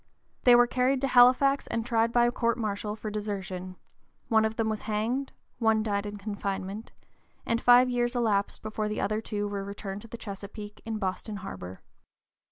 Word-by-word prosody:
They 245 -1 +8
were 240 0 +7
carried 255 +2 +1
to 275 - +1
Halifax 260 +2 +5
and 230 -1 -2
tried 230 -1 +2
by 240 0 +4
court 235 -1 0
martial 210 -2 -3
for 215 -1 -6
desertion: 190 -3 -4 0.5
one 220 -2 +4
of 220 0 -2
them 225 -1 0
was 215 -1 -2
hanged; 235 +6 -1 0.3
one 220 -2 +3
died 205 -1 -1
in 205 0 -6
confinement, 200 0 -4 0.5
and 230 0 0
five 245 +1 +7
years 245 0 0
elapsed 210 -4 0
before 215 0 -2
the 210 - -3
other 215 +1 0
two 205 -2 -3
were 200 -1 -4
returned 200 0 -6
to 230 - -11
the 235 - -8
Chesapeake 205 0 -8
in 225 -1 -3
Boston 205 +2 -3
harbor. 95 - -8
215 Hz, 175 wpm, -28 LUFS, 205-240 Hz, 0.5 s, They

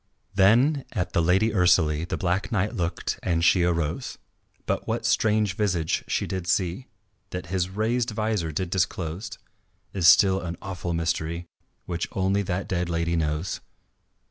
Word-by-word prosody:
Then 120 +9 +4
at 90 - -2
the 85 - +3
Lady 95 +7 +3
Ursalie 85 -5 +3
The - - -1
Black 90 +5 -1
Knight 105 -1 0
looked 85 -1 -2
and 85 -2 +1
she 90 - +5
arose. 85 -3 -1 0.5
But - - -2
what - - -2
strange 105 -2 +2
visage 90 -7 0
she - - 0
did 95 -2 -4
see 90 +6 0 0.4
That 90 -1 -5
his 90 -1 0
raised 115 +5 0
vizor 110 -6 -1
did 90 +3 -3
disclose 90 +1 -2 0.6
Is 90 -4 +2
still 95 +1 +6
an 85 -1 -5
awful 90 -3 -4
mystery 85 +1 -2 0.4
Which 85 -1 -3
only 95 +1 +1
that 95 0 -3
dead 90 -1 -1
lady 85 0 0
knows. 75 +2 -2
90 Hz, 150 wpm, -25 LUFS, 85-100 Hz, 0.6 s, still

